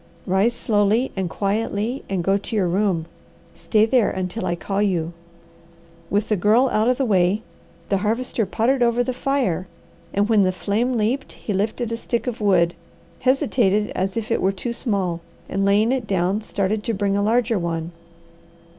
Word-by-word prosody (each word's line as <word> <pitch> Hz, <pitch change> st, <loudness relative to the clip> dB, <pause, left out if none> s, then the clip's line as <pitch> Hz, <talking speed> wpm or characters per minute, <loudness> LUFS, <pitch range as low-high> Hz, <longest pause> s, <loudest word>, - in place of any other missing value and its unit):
"Rise 195 Hz, +6 st, +2 dB
slowly 215 Hz, +3 st, +1 dB
and 190 Hz, -3 st, -2 dB
quietly 210 Hz, +5 st, -2 dB
and 190 Hz, -3 st, -1 dB
go 195 Hz, +3 st, +2 dB
to 200 Hz, +3 st, -4 dB
your 195 Hz, -4 st, +2 dB
room. 180 Hz, -2 st, +1 dB, 0.5 s
Stay 215 Hz, -1 st, +2 dB
there 235 Hz, -1 st, +3 dB
until 185 Hz, +4 st, -3 dB
I 175 Hz, -, 0 dB
call 195 Hz, +3 st, -2 dB
you." 175 Hz, -5 st, 0 dB, 1.0 s
With 205 Hz, +1 st, 0 dB
the 215 Hz, -, +3 dB
Girl 220 Hz, +7 st, +3 dB
out 215 Hz, 0 st, +1 dB
of 250 Hz, 0 st, +2 dB
the 270 Hz, -, +1 dB
way, 195 Hz, -1 st, +2 dB, 0.5 s
the 195 Hz, -, +2 dB
Harvester 220 Hz, +1 st, -1 dB
pottered 245 Hz, +6 st, +1 dB
over 240 Hz, 0 st, +3 dB
the 255 Hz, +1 st, -2 dB
fire, 250 Hz, -, -1 dB, 0.4 s
and 205 Hz, +1 st, +1 dB
when 220 Hz, -2 st, +4 dB
the 185 Hz, -1 st, +3 dB
flame 220 Hz, +7 st, -1 dB
leaped 230 Hz, +6 st, -1 dB
he 210 Hz, -, -5 dB
lifted 220 Hz, +4 st, -1 dB
a 230 Hz, -, -2 dB
stick 235 Hz, 0 st, -2 dB
of 245 Hz, -3 st, -4 dB
wood, 175 Hz, -4 st, +3 dB, 0.5 s
hesitated 245 Hz, -6 st, +2 dB
as 190 Hz, +3 st, -2 dB
if 225 Hz, +1 st, -3 dB
it -, -, +1 dB
were 190 Hz, -, +3 dB
too 215 Hz, +5 st, -4 dB
small, 195 Hz, -8 st, -1 dB, 0.3 s
and 195 Hz, +1 st, -1 dB
laying 210 Hz, +4 st, +3 dB
it 255 Hz, -4 st, -1 dB
down, 190 Hz, +2 st, 0 dB
started 210 Hz, 0 st, -1 dB
to 230 Hz, -, -1 dB
bring 200 Hz, 0 st, 0 dB
a 200 Hz, -, +1 dB
larger 230 Hz, 0 st, +2 dB
one. 165 Hz, -1 st, -3 dB
210 Hz, 180 wpm, -22 LUFS, 190-230 Hz, 1.0 s, when